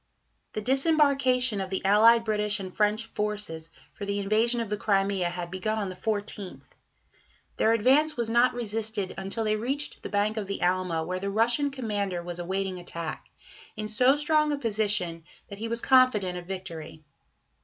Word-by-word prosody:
The 215 Hz, -, -3 dB
disembarkation 265 Hz, -4 st, +2 dB
of 190 Hz, -, -4 dB
the 190 Hz, 0 st, -3 dB
allied 225 Hz, +4 st, +6 dB
British 210 Hz, -1 st, +1 dB
and 185 Hz, -2 st, -7 dB
French 215 Hz, +1 st, +1 dB
forces 210 Hz, -7 st, -4 dB, 0.2 s
for -, -, -9 dB
the 200 Hz, 0 st, -2 dB
invasion 220 Hz, +4 st, +2 dB
of 225 Hz, -3 st, -4 dB
the -, -, +1 dB
Crimea 195 Hz, -3 st, +1 dB
had 175 Hz, 0 st, -6 dB
begun 215 Hz, +4 st, -2 dB
on 205 Hz, -3 st, -2 dB
the 185 Hz, -, -7 dB
14th. 205 Hz, -1 st, -3 dB, 0.9 s
Their 225 Hz, -, +3 dB
advance 270 Hz, +7 st, +3 dB
was 235 Hz, -1 st, 0 dB
not 240 Hz, +2 st, +3 dB
resisted 220 Hz, -4 st, -2 dB
until 195 Hz, +4 st, -2 dB
they 215 Hz, 0 st, +1 dB
reached 270 Hz, +7 st, -3 dB
the -, -, -6 dB
bank 210 Hz, +1 st, 0 dB
of 210 Hz, -3 st, -3 dB
the 200 Hz, -, -4 dB
Alma, 180 Hz, -2 st, 0 dB
where 185 Hz, +3 st, -3 dB
the 200 Hz, +1 st, -3 dB
Russian 240 Hz, +7 st, +2 dB
commander 205 Hz, -9 st, -3 dB
was 175 Hz, 0 st, -3 dB
awaiting 190 Hz, +1 st, -3 dB
attack, 170 Hz, -2 st, -6 dB, 0.5 s
in 215 Hz, 0 st, -3 dB
so 250 Hz, +6 st, +3 dB
strong 305 Hz, 0 st, +2 dB
a 290 Hz, -, -1 dB
position 210 Hz, -8 st, 0 dB, 0.3 s
that 200 Hz, -1 st, -9 dB
he 225 Hz, -, -3 dB
was 230 Hz, +1 st, -2 dB
confident 255 Hz, -9 st, +4 dB
of 175 Hz, -1 st, -7 dB
victory. 165 Hz, -5 st, -7 dB
210 Hz, 175 wpm, -27 LUFS, 190-235 Hz, 0.9 s, allied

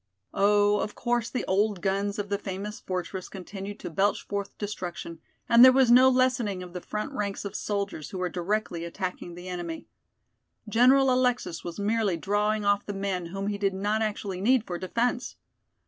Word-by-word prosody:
Oh, 205 Hz, +1 st, +4 dB
of 210 Hz, -, -3 dB
course 240 Hz, -1 st, 0 dB
the 255 Hz, -, -3 dB
old 200 Hz, +1 st, +1 dB
guns 200 Hz, +2 st, -1 dB
of 205 Hz, -1 st, -3 dB
the 200 Hz, -1 st, -1 dB
famous 200 Hz, +2 st, -5 dB
fortress 185 Hz, 0 st, -4 dB
continued 195 Hz, +1 st, -7 dB
to -, -, -6 dB
belch 195 Hz, +5 st, +1 dB
forth 200 Hz, -1 st, -4 dB
destruction, 180 Hz, -5 st, -5 dB, 0.3 s
and 235 Hz, +1 st, +7 dB
there 260 Hz, -, +10 dB
was 260 Hz, -2 st, +4 dB
no 255 Hz, +2 st, +8 dB
lessening 250 Hz, -7 st, +1 dB
of 180 Hz, -1 st, -11 dB
the 180 Hz, -, -5 dB
front 210 Hz, +8 st, -4 dB
ranks 205 Hz, -5 st, -3 dB
of 200 Hz, -, -5 dB
soldiers, 200 Hz, -7 st, -3 dB
who 190 Hz, -, -6 dB
were 180 Hz, 0 st, -1 dB
directly 180 Hz, -1 st, -2 dB
attacking 175 Hz, 0 st, -5 dB
the 175 Hz, +1 st, -9 dB
enemy. 175 Hz, -2 st, -5 dB, 0.8 s
General 255 Hz, +4 st, +5 dB
Alexis 250 Hz, -9 st, 0 dB
was 170 Hz, +2 st, -6 dB
merely 210 Hz, -3 st, +1 dB
drawing 210 Hz, +4 st, 0 dB
off 205 Hz, 0 st, +3 dB
the 205 Hz, -, -5 dB
men 195 Hz, -3 st, -2 dB
whom 195 Hz, +3 st, -5 dB
he 205 Hz, 0 st, -2 dB
did 195 Hz, -2 st, 0 dB
not 205 Hz, +3 st, 0 dB
actually 205 Hz, -3 st, -3 dB
need 240 Hz, +2 st, +3 dB
for 175 Hz, -1 st, -4 dB
defense. 240 Hz, +6 st, -1 dB
200 Hz, 180 wpm, -27 LUFS, 185-215 Hz, 0.8 s, there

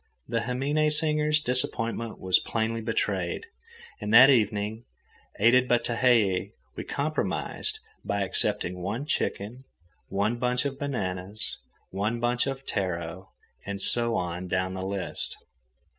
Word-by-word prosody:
The 115 Hz, 0 st, 0 dB
himine 140 Hz, +6 st, +1 dB
singers' 150 Hz, 0 st, +2 dB
disappointment 115 Hz, -4 st, -1 dB
was 95 Hz, -1 st, +4 dB
plainly 115 Hz, 0 st, -2 dB
betrayed, 100 Hz, -6 st, -1 dB, 0.6 s
and 105 Hz, 0 st, -3 dB
that 130 Hz, +5 st, +9 dB
evening, 110 Hz, -1 st, +1 dB, 0.6 s
aided 125 Hz, +4 st, +5 dB
by 120 Hz, -, +4 dB
Tehei, 115 Hz, -6 st, +2 dB, 0.2 s
we -, -, -5 dB
compromised 155 Hz, -, -2 dB, 0.3 s
by 100 Hz, 0 st, -1 dB
accepting 90 Hz, -1 st, 0 dB
one 105 Hz, +10 st, -3 dB
chicken, 120 Hz, -3 st, -2 dB, 0.4 s
one 105 Hz, +5 st, 0 dB
bunch 125 Hz, +1 st, +1 dB
of 135 Hz, -1 st, -3 dB
bananas, 100 Hz, -7 st, -3 dB, 0.4 s
one 105 Hz, +5 st, -1 dB
bunch 120 Hz, +2 st, +1 dB
of 135 Hz, 0 st, -4 dB
taro, 90 Hz, -1 st, -3 dB, 0.3 s
and 100 Hz, 0 st, -5 dB
so 115 Hz, +3 st, +3 dB
on 90 Hz, +1 st, -3 dB
down 95 Hz, +1 st, -1 dB
the 95 Hz, -, -5 dB
list. 95 Hz, -1 st, -1 dB
115 Hz, 125 wpm, -27 LUFS, 95-125 Hz, 0.6 s, that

